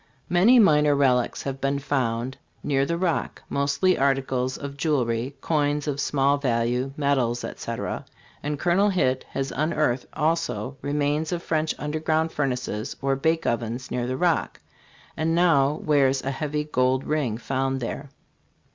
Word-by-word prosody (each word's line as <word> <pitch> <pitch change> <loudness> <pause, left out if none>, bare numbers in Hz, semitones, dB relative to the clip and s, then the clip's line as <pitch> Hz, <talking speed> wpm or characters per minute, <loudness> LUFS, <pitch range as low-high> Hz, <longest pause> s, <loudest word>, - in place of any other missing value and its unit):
Many 190 +9 +5
minor 150 -9 +5
relics 125 -3 +2
have 135 -1 -4
been 135 +1 +1
found 130 -3 -1 0.3
near 135 -1 +1
the 170 - -1
Rock, 175 -2 -1
mostly 140 +7 +1
articles 135 -1 0
of 140 -1 -7
jewelry, 135 -4 0
coins 150 -1 0
of 145 -1 -1
small 140 0 +2
value, 125 0 0
medals, 130 -5 +1
etc.; - - -5 0.4
and 150 0 -2
Col. 190 +4 +3
Hitt 130 -9 +1
has 135 0 -3
unearthed 150 -4 0
also 140 -7 -1
remains 145 +2 0
of 175 -1 -3
French 155 -1 0
underground 155 +2 -1
furnaces 125 -4 -2
or 135 0 +1
bake 160 +4 0
ovens 120 +2 -2
near 120 -1 -1
the 130 +1 -2
Rock, 175 -1 0 0.6
and 160 +1 0
now 155 -5 +4
wears 135 -3 +3
a 135 - -1
heavy 150 +1 -2
gold 130 -2 +1
ring 140 -8 -1
found 135 +2 -1
there. 135 +3 -5
140 Hz, 145 wpm, -25 LUFS, 130-155 Hz, 0.6 s, Many